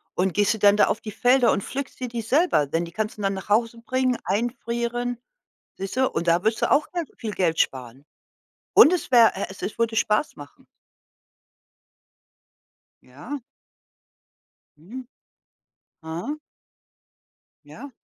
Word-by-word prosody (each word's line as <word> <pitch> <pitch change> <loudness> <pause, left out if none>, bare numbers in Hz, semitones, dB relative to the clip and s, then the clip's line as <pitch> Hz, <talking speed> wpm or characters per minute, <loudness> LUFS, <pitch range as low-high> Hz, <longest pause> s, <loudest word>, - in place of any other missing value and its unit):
und 185 0 0
gehst 205 +3 +2
du 220 - -7
dann 205 0 +5
da 210 - +4
auf - - -1
die 220 -2 -8
Felder 245 +3 +3
und 195 - -2
pflückst 275 +1 -6
dir 250 - -3
die 235 -1 -4
selber, 255 - +2
denn 165 +4 -1
die 170 - -8
kannst 215 +5 -4
du - - -8
dann 195 -1 0
nach 190 - -8
Hause 230 +2 +1
bringen, 255 -1 0
einfrieren, 235 +3 -2 0.6
siehste? 255 +7 -1
Und 170 +2 -3
da 170 +1 +3
wirst 220 0 +1
du - - +1
auch 295 +1 +3
ganz 345 -4 -3
viel 220 -3 -5
Geld 165 -4 0
sparen. 130 +1 -2 0.7
Und 325 - +8
es 360 - -2
wäre 235 -3 +7
e 195 - -3
es 195 +3 -7
würde 230 -1 0
Spaß 215 +6 +1
machen. 145 -1 -14 2.4
Ja. 180 - -8 1.4
Mhm. 235 +11 -10 1.0
Aha. 170 - -5 1.3
Ja. 280 - -11
225 Hz, 145 wpm, -24 LUFS, 190-245 Hz, 2.4 s, Und